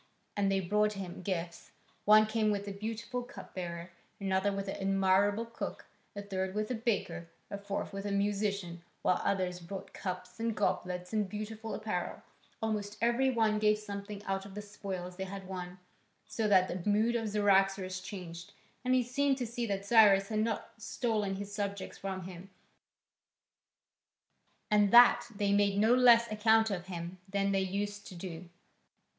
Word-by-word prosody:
And 200 -1 +1
they 195 0 +2
brought 210 +3 +2
him 190 -3 -6
gifts; 170 -2 -4 0.3
one 215 +1 +7
came 215 0 +1
with 205 -1 -1
a - - -3
beautiful 220 +4 -4
cup 245 - -11
bearer, 170 -1 -5 0.3
another 195 0 +1
with 195 0 -3
an 195 - -3
admirable 195 +2 +2
cook, 230 0 -6 0.3
a 205 - -5
third 190 -1 -3
with 215 +2 -1
a - - +1
baker, 200 -8 -2 0.2
a 200 - -3
fourth 200 0 -4
with 195 +1 -4
a - - -2
musician, 200 -3 -1 0.2
while 180 - +2
others 185 -2 0
brought 185 +3 -8
cups 185 +3 -6
and 230 -1 -1
goblets 180 -2 -1
and 210 -3 0
beautiful 215 +2 -5
apparel; 210 -5 -3 0.4
almost 210 -1 -2
every 240 +3 +3
one 220 -4 +2
gave 210 0 +4
something 205 -1 -7
out 195 -1 -2
of 200 0 -11
the 210 - -4
spoils 190 -3 -6
they 190 - -3
had 195 0 -7
won. 180 -1 -6 0.5
So 215 0 -1
that 185 -3 +5
the 180 +3 -3
mood 220 +3 +3
of 225 -2 -1
Cyaxares 195 -2 +2
changed, 175 -3 -8 0.3
and 255 0 +3
he 255 - +3
seemed 275 +3 +1
to 250 - -2
see 235 +1 -3
that 200 -1 -2
Cyrus 200 -3 +6
had 215 -1 0
not 220 -1 -1
stolen 215 -3 -1
his 200 +1 -6
subjects 200 -1 -4
from 190 -1 -4
him, 185 +1 -9 2.2
and 210 -1 +5
that 240 +2 +7
they 200 0 +1
made 200 -1 +3
no 220 +3 +5
less 235 -2 +6
account 220 +1 +4
of 180 -1 -4
him 175 0 -6
than 200 0 +1
they 195 - +2
used 205 +2 -3
to 185 - -9
do. 170 -1 -7
200 Hz, 170 wpm, -32 LUFS, 190-215 Hz, 2.2 s, one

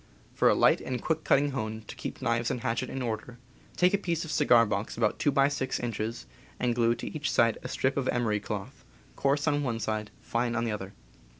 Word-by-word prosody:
For - - +4
a - - +4
light - - +4
and 125 -1 -3
quick 160 +6 -1
cutting 145 +1 +3
hone, 110 -4 -4
to - - -8
keep - - -6
knives 115 -1 +1
and 120 - -2
hatchet 120 +3 -1
in 135 - -4
order, 115 +1 -4 0.4
take 180 +1 +4
a 200 - +3
piece 170 -4 -2
of 160 - -6
cigar 125 -7 +5
box 105 +1 -3
about 115 -3 +2
^, - - -26
two 145 - +3
by 135 0 +4
six 135 -2 -2
inches 115 -1 -3 0.3
and 125 -1 +1
glue 115 0 +2
to - - -6
each 150 -1 -1
side 115 -2 +3
a - - -5
strip 130 +1 0
of 135 -2 0
emery 115 -4 +1
cloth, 105 +6 -6 0.3
coarse 145 +2 +1
on 145 -1 +2
one 120 -5 -1
side, 110 -1 -2
fine 120 0 -1
on 115 0 0
the 115 - -1
other. 100 -2 -5
120 Hz, 230 wpm, -29 LUFS, 110-140 Hz, 0.4 s, cigar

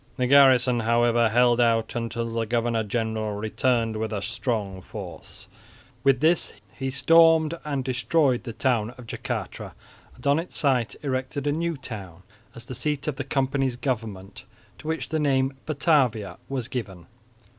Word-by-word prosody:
The 125 - +1
garrison 130 -2 +5
however 115 0 +3
held 120 +1 +4
out 115 -2 +2
until 115 0 -2
the 115 -1 -1
governor 115 0 0
general 110 0 -2
returned 115 +1 0
with 110 0 -3
a 105 - -2
strong 110 -5 -2
force. 90 -4 -10 0.6
With 135 -2 +3
this 160 +2 +2 0.2
he 135 0 -3
stormed 165 +3 +5
and 140 -3 -2
destroyed 130 +1 +1
the 115 - -5
town 120 -1 0
of 125 - -11
Jacatra 110 - -5 0.4
and 125 - -16
on 140 +2 +4
its 170 - -6
site 130 -6 +1
erected 135 +1 -3
a 145 - +2
new 165 +1 -1
town, 95 -9 -9 0.3
as 120 - -9
the 130 - -7
seat 150 +3 -2
of 145 -3 -2
the 145 - -2
company's 135 -1 0
government, 110 -7 -4 0.4
to - - -10
which 160 0 -3
the 160 - -1
name 135 -2 +1
Batavia 135 - +1
was 130 -4 -3
given. 100 -9 -6
125 Hz, 155 wpm, -25 LUFS, 115-140 Hz, 0.6 s, garrison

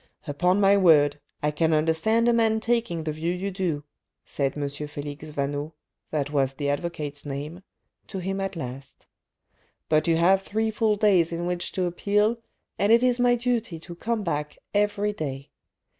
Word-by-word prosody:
" - - -47
Upon 180 +6 +1
my 200 0 +5
word, 150 -6 +5 0.2
I 150 - +2
can 160 +1 +2
understand 165 +10 +2
a 240 - +5
man 225 -1 +3
taking 230 -8 0
the 155 - -2
view 160 +3 -2
you 190 +3 -3
do," 175 -6 -2 0.4
said 140 0 -1
M. 145 -1 -1
Felix 145 +1 -7
Vaneau 145 +1 -3 0.4
(that 145 -2 -2
was 135 -2 +1
the 140 +1 -2
advocate's 145 -1 -3
name) 145 +5 -6 0.5
to 195 - -6
him 195 +1 -3
at 195 0 -3
last. 135 -3 -8 0.4
" - - -42
But 155 0 +3
you 165 -1 +3
have 190 +3 +4
three 220 +3 -1
full 220 -1 +2
days 195 -5 +3
in 170 +1 -3
which 175 0 -2
to 185 - 0
appeal, 210 +6 +1 0.4
and 200 +3 +3
it 235 +2 +6
is 250 -1 +3
my 245 0 +4
duty 235 -7 -1
to 175 - -9
come 225 +5 -2
back 150 -4 -3 0.2
every 205 0 +1
day. 140 -6 -5
170 Hz, 180 wpm, -25 LUFS, 150-205 Hz, 0.5 s, it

